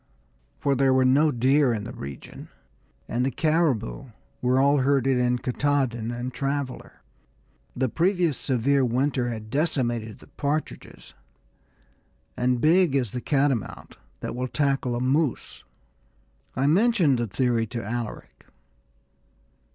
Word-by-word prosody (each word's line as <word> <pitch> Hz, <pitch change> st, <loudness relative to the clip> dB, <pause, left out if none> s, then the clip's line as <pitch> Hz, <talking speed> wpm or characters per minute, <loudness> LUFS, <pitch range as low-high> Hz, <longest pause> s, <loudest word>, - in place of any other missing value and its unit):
For 140 Hz, -, +1 dB
there 135 Hz, 0 st, +3 dB
were 130 Hz, 0 st, +3 dB
no 145 Hz, +5 st, +4 dB
deer 135 Hz, +1 st, +3 dB
in 105 Hz, -, -4 dB
the 115 Hz, -, -7 dB
region, 70 Hz, 0 st, -9 dB, 0.6 s
and 120 Hz, +1 st, -1 dB
the 135 Hz, -, +1 dB
caribou 140 Hz, -, 0 dB, 0.4 s
were 125 Hz, +1 st, +2 dB
all 140 Hz, +1 st, +4 dB
herded 135 Hz, -1 st, +2 dB
on 125 Hz, 0 st, +1 dB
Katahdin 125 Hz, -3 st, -1 dB
and 120 Hz, +1 st, -5 dB
Traveller. 140 Hz, +1 st, -4 dB, 0.7 s
The 130 Hz, +1 st, 0 dB
previous 170 Hz, -, +1 dB
severe 135 Hz, +2 st, +1 dB
winter 125 Hz, +1 st, 0 dB
had 110 Hz, -2 st, -7 dB
decimated 120 Hz, -7 st, -1 dB
the -, -, -17 dB
partridges, 145 Hz, +2 st, -5 dB, 1.2 s
and 125 Hz, 0 st, 0 dB
big 165 Hz, +1 st, +3 dB
is 125 Hz, -7 st, 0 dB
the 125 Hz, -, -4 dB
catamount 135 Hz, -6 st, -1 dB, 0.2 s
that -, -, -4 dB
will 125 Hz, +1 st, -2 dB
tackle 135 Hz, -3 st, 0 dB
a -, -, -2 dB
moose. 135 Hz, +2 st, -1 dB, 0.9 s
I 130 Hz, -, 0 dB
mentioned 175 Hz, -, +3 dB
the 120 Hz, -, -1 dB
theory 115 Hz, +2 st, 0 dB
to 115 Hz, +1 st, -5 dB
Alaric. 115 Hz, 0 st, -6 dB
130 Hz, 130 wpm, -25 LUFS, 120-145 Hz, 1.2 s, no